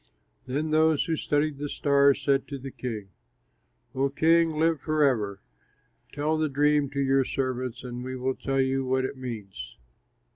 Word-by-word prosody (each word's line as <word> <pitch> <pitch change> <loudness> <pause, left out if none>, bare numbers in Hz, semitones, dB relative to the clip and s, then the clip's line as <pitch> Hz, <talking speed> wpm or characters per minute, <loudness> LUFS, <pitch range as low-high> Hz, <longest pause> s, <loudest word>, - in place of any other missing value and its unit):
Then 150 +4 -2
those 155 -1 +3
who 165 - 0
studied 145 -1 0
the 145 0 -3
stars 140 -1 +3
said 135 -1 +1
to 140 - -5
the 135 0 -8
king: 110 -7 -6 0.8
"O 135 +1 +1
king, 165 +3 +3
live 160 -1 +1
forever! 130 -11 +1 0.7
Tell 155 +2 -1
the 155 -1 +1
dream 145 0 +2
to 140 0 -4
your 135 0 +3
servants 130 -2 -3
and 125 -1 -6
we 130 0 -5
will 130 +1 -1
tell 135 +1 -2
you 135 0 +1
what 130 0 0
it 135 - -4
means." 105 - -7
135 Hz, 160 wpm, -27 LUFS, 130-150 Hz, 0.8 s, those